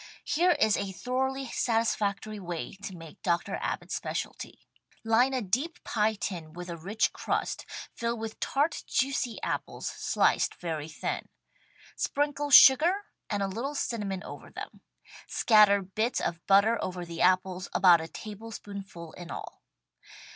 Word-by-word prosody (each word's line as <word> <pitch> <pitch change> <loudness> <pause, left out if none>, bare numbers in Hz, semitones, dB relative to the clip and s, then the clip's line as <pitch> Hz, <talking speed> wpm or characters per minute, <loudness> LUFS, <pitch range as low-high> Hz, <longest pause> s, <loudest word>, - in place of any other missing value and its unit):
Here 350 +4 +3
is 220 -7 +3
a 200 -1 -3
thoroughly 265 +6 -2
satisfactory 215 -3 0
way 175 -3 -5
to 195 -1 -8
make 165 +3 -12
Dr. 175 -1 0
Abbott's - - -3
specialty: - - -4 0.5
Line 230 +4 +4
a 260 -3 -1
deep 260 - -2
pie 220 0 +1
tin 170 -6 -5
with 175 +1 -7
a - - -4
rich 195 +7 0
crust, - - -2 0.3
fill 235 0 -2
with 220 0 -6
tart, 290 +4 0
juicy 260 -3 0
apples - - -3
sliced - - +1
very 160 -3 -4
thin. - - -4 0.7
Sprinkle 290 0 -1
sugar 320 +9 +8 0.3
and 205 -2 0
a - - 0
little 240 +9 -4
cinnamon 205 -8 -2
over - - -9
them. - - -9 0.5
Scatter 210 -3 +5
bits 215 +6 -1
of 170 0 -3
butter 200 +4 +4
over 180 -1 -4
the 170 -1 -6
apples, 185 0 +2
about 175 -3 +6
a 160 - -6
tablespoonful 200 -4 -8
in 175 -1 -10
all. - - -8
205 Hz, 140 wpm, -29 LUFS, 185-240 Hz, 0.7 s, sugar